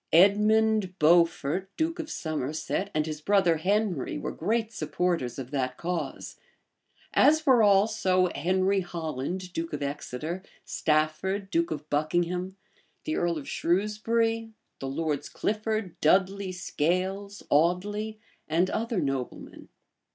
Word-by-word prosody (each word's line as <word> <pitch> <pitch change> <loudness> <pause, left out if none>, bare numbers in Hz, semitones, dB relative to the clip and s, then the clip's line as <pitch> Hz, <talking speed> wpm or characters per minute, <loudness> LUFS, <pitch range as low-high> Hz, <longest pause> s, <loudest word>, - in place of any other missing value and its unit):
Edmund 210 +1 +4
Beaufort, 170 +1 +3
duke 325 +1 -1
of 315 -2 -4
Somerset, 155 - -2
and 155 0 +2
his 155 -1 -5
brother 190 -2 +3
Henry, 195 -3 0
were - - -4
great 225 +5 -1
supports 155 - -1
of 130 -2 -6
that 130 -3 -1
cause; 175 0 -4 0.7
as 310 +1 +5
were 260 -5 +6
also 195 -3 +3
Henry 185 +5 +1
Holland 175 +1 -4
duke 165 -1 -4
of 145 - -3
Exeter, 150 +4 -4 0.2
Stafford, 165 +6 0
duke 170 -1 +1
of 150 -1 -5
Buckingham, 175 +5 0 0.5
the 310 - -2
earl 170 -1 0
of 145 - -7
Shrewsbury, 225 +5 0 0.3
the 135 - -4
Lords 145 0 -2
Clifford, 215 -3 -2
Dudley, 190 +4 +2
Scales, 185 +4 -2
Audley, 205 +7 +1 0.3
and 170 +4 +1
other 230 -2 -1
noblemen. 135 -5 -4
180 Hz, 120 wpm, -27 LUFS, 155-205 Hz, 0.7 s, were